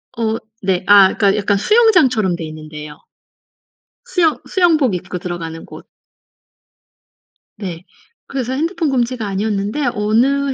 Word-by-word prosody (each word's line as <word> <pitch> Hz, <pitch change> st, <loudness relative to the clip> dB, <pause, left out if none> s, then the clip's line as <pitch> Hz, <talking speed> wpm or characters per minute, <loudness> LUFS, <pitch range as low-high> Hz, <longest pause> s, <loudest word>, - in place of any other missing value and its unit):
어 225 Hz, -1 st, -1 dB, 0.3 s
네. 190 Hz, -1 st, 0 dB
아 200 Hz, -2 st, +6 dB
그러니까 200 Hz, -2 st, +2 dB
약간 200 Hz, -1 st, +1 dB
수영장처럼 270 Hz, -, +3 dB
돼 170 Hz, -, -6 dB
있는 155 Hz, 0 st, -9 dB
데예요. 150 Hz, -1 st, -9 dB, 1.1 s
수영 355 Hz, -10 st, +1 dB
수영복 315 Hz, -, +2 dB
입고 180 Hz, +1 st, -5 dB
들어가는 165 Hz, -2 st, -6 dB
곳. -, -, -12 dB, 1.7 s
네. 180 Hz, -4 st, -7 dB, 0.4 s
그래서 260 Hz, -2 st, -3 dB
핸드폰 325 Hz, +3 st, -1 dB
금지가 245 Hz, -3 st, -1 dB
아니었는데 205 Hz, +6 st, -2 dB
어느 260 Hz, +7 st, +1 dB
215 Hz, 280 characters per minute, -17 LUFS, 185-275 Hz, 1.7 s, 아